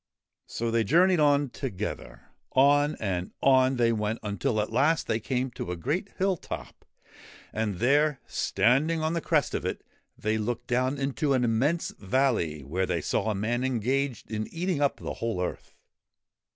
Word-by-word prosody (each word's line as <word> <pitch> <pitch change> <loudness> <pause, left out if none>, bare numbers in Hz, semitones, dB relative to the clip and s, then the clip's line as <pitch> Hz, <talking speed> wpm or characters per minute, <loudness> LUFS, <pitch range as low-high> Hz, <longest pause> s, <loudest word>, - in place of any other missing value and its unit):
So 115 0 -2
they 115 0 +2
journeyed 175 - +4
on 145 -3 +3
together. 65 - -6 0.2
On 145 +2 +4
and 90 -4 -3
on 130 -1 +5
they 120 -2 +3
went 105 0 -1
until 105 +2 -1
at 105 - -1
last 160 +4 +2
they 110 0 0
came 125 +2 -2
to 90 - -5
a 90 - -4
great 160 - -2
hill 190 -1 +1
top, - - -8 0.7
and 110 -2 -1
there, 145 +5 +3
standing 140 +11 +1
on 160 +1 0
the 170 - -1
crest - - +1
of - - -2
it, - - -3 0.3
they 110 +1 -1
looked 120 +2 -3
down 130 +3 0
into 140 +1 0
an 130 -2 +2
immense 130 +9 +1
valley 100 - 0
where 90 +7 -1
they 85 -2 -1
saw 110 - 0
a 105 - 0
man 115 +5 -1
engaged 130 0 -1
in 110 0 -2
eating 175 -2 -1
up 140 - +2
the - - -5
whole 115 -5 -1
earth. 90 - -4
125 Hz, 170 wpm, -27 LUFS, 110-145 Hz, 0.7 s, on